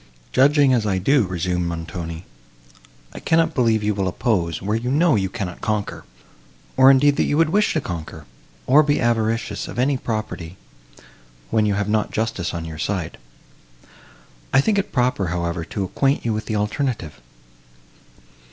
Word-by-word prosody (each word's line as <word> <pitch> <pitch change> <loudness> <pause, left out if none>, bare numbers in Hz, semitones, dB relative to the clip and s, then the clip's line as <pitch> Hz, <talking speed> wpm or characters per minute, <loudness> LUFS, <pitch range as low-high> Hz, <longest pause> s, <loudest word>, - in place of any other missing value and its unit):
"Judging 140 0 +4
as 120 -3 +2
I 95 -2 +1
do," 120 +3 +2
resumed 90 -1 -2
Montoni, 85 0 -6 0.9
"I - - -8
cannot 160 0 +2
believe 115 -5 +2
you 105 0 +1
will 95 -1 -1
oppose, 90 - -1
where 105 +3 -2
you 120 +2 -2
know 155 +3 +3
you 95 -2 0
cannot 95 -5 -6
conquer, 105 -2 -3 0.7
or, 130 0 +7
indeed, 140 +1 +5
that - - +2
you 145 - 0
would 165 -1 +3
wish 210 +2 +2
to 155 - 0
conquer, 80 -3 -7 0.4
or 140 +4 +6
be 145 -1 +1
avaricious 115 -1 -1
of - - -8
any 135 +2 +2
property, 110 -7 -5 0.9
when 110 -1 +2
you 100 - +1
have 105 0 -1
not 105 0 0
justice 110 -6 -2
on 85 -1 -5
your 80 -1 -8
side. 90 -4 -3 1.3
I - - +5
think 200 +8 +2
it 195 - -3
proper, 125 -7 +1
however, 85 -1 -2
to 100 +4 -4
acquaint 135 +9 0
you 115 - +1
with 110 0 -4
the 110 - -2
alternative. 105 - -2
110 Hz, 165 wpm, -21 LUFS, 90-130 Hz, 1.3 s, or